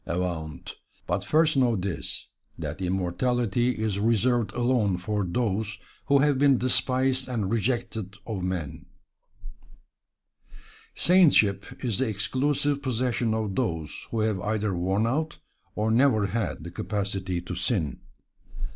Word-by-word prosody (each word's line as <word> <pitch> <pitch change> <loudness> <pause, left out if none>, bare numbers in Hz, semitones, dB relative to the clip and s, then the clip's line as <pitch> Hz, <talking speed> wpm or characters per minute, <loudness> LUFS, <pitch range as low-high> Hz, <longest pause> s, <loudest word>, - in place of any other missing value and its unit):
Avaunt! 85 -5 -4 0.3
but 90 +3 -1
first 155 +6 +3
know 125 -4 +3
this, 95 -3 -4 0.3
that - - -5
immortality 105 +6 0
is 105 -2 -1
reserved 115 0 +2
alone 120 -6 +1
for 105 +3 -2
those 105 +2 -1 0.3
who 140 - +5
have 140 -1 +3
been 140 -2 +5
despised 130 +1 +1
and 110 -6 -1
rejected 115 -3 -1
of 105 -5 -4
men. 90 -5 -4 2.1
Saintship 130 - +3
is 115 -2 0
the 130 -3 +1
exclusive 140 +7 0
possession 120 -3 0
of 110 -3 -2
those 80 - -2
who 115 - -1
have 110 -4 0
either 105 -1 -1
worn 95 +5 +1
out, 150 +6 -1 0.4
or 110 +1 0
never 115 -3 +4
had, 105 -3 -2
the 85 - -7
capacity 95 -1 -2
to 90 - -6
sin. 90 - 0
110 Hz, 125 wpm, -26 LUFS, 95-125 Hz, 2.1 s, who